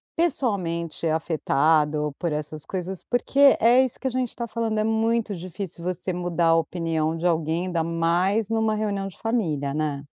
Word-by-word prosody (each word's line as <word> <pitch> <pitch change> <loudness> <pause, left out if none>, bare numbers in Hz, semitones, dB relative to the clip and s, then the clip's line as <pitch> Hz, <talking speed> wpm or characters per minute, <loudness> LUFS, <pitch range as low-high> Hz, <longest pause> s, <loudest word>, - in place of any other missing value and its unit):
pessoalmente 190 - -1
afetado 150 -2 +1
por 170 -3 -2
essas 150 0 -4
coisas, 185 0 -5
porque 275 +3 +4
é 245 +3 +6
isso 255 - -4
que 265 - -2
a - - +1
gente 255 -1 -2
tá 235 0 -4
falando, 220 -1 -1
é - - +2
muito 225 -1 0
difícil 180 0 -7
você 180 +1 -2
mudar 175 -1 0
a 165 - +5
opinião 165 -1 -1
de 170 +2 -1
alguém, 165 +1 0
ainda 170 -3 0
mais 175 +6 +1
numa 220 -1 +1
reunião 200 -2 -2
de 175 -5 -11
família, 160 - -1
né. 150 -2 -2
175 Hz, 170 wpm, -24 LUFS, 160-220 Hz, -, é